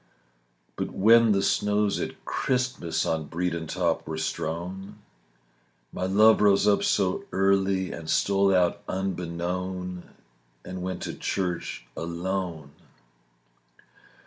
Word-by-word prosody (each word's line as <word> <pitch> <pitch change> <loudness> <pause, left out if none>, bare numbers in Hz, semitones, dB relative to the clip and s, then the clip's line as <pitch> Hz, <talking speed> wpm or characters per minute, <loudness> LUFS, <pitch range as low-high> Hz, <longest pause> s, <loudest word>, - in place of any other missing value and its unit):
But - - -2
when 115 +3 +5
the 100 -1 +2
snows 105 0 +1
at - - -6
Christmas 125 -10 -1
On 80 -1 -1
Bredon 85 -1 -2
top - - -1
were 80 0 -4
strown, 85 +5 -4 1.0
My 95 - -2
love 110 +3 +5
rose 100 0 +4
up 105 - +4
so 95 -3 +1
early 95 -1 +2
And 80 -1 -7
stole 100 +3 +3
out 90 -2 +2
unbeknown 90 0 -3 0.6
And 90 0 -6
went 95 0 -4
to - - -4
church 90 -9 -3
alone. 85 -2 -4
95 Hz, 110 wpm, -26 LUFS, 85-100 Hz, 1.0 s, when